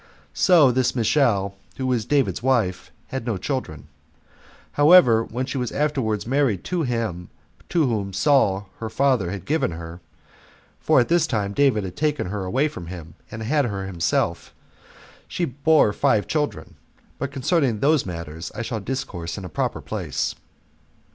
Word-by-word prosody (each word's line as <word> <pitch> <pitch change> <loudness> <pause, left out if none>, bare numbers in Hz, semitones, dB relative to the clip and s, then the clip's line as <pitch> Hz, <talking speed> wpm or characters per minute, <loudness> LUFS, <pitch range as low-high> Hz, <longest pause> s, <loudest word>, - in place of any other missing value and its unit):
So 165 -8 +5
this 130 0 +1
Michal, 110 -5 +2 0.2
who 130 - -3
was 125 -4 0
David's 140 -6 +1
wife, 95 -9 0 0.2
had 130 -2 -4
no 115 -4 -2
children; 90 - -4 0.8
however, 145 -7 +6
when 125 +3 -4
she 135 0 -4
was 125 -2 -2
afterward 130 -8 -1
married 130 -6 +1
to 180 -2 -2
him 115 - -3 0.4
to 165 -4 +2
whom 105 -6 -1
Saul 100 -4 +2
her 110 - -4
father 125 -7 +1
had 95 -1 -6
given 150 -5 +1
her, 85 +1 -8 0.8
[for - - +3
at 120 - +2
this 170 -1 +2
time 105 -6 -1
David 130 -5 +2
had 90 -2 -6
taken 150 -6 0
her 100 -1 -3
away 130 +11 +1
from 90 - -8
him, 85 -2 -9 0.2
and 110 0 -7
had 145 +4 +1
her 100 -4 -3
himself,] 85 -3 -1 0.7
she 175 - -2
bare 140 -4 +3
five 105 0 +2
children. 150 -2 -3 0.4
But 140 - -3
concerning 135 - +1
those 150 +2 +3
matters 85 -2 -7
I 120 - -3
shall 115 -1 -3
discourse 100 -8 -5
in 100 - -6
a - - -7
proper - - -2
place. - - -3
120 Hz, 160 wpm, -23 LUFS, 95-140 Hz, 0.8 s, however